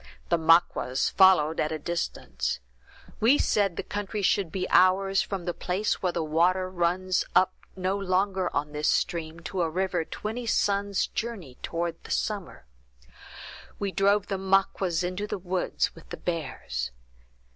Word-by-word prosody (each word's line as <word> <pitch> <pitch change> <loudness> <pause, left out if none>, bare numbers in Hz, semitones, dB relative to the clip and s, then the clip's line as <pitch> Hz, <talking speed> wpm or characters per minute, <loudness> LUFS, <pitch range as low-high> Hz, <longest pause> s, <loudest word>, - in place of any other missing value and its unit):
The 170 - +3
Maquas 160 -5 +3
followed 170 -5 +5
at 155 - 0
a 160 - -1
distance. 170 +3 -3 0.6
We 245 +7 +5
said 200 -4 +1
the - - -2
country 205 0 -4
should 195 -3 +2
be 185 -1 -2
ours 195 +1 +4
from 190 -4 -4
the 175 - -1
place 185 +5 -1
where 185 -3 +1
the 170 -1 -2
water 180 +4 +2
runs 180 +1 +1
up 185 0 +5 0.2
no 190 +1 -1
longer 190 -1 0
on 145 +1 -2
this 150 +1 -1
stream, 165 -1 -1
to 180 +3 -3
a 165 - +1
river 180 0 -1
twenty 225 +8 -5
sun's 200 -2 +1
journey 195 - -5
toward 170 0 -3
the - - -12
summer. 200 - -3 1.1
We 200 -1 -2
drove 200 +1 +3
the 195 -2 -3
Maquas 190 -2 +1
into 185 +4 -3
the - - -3
woods 185 0 -1
with 165 - -16
the - - -6
bears. 165 - -3
185 Hz, 155 wpm, -27 LUFS, 170-195 Hz, 1.1 s, followed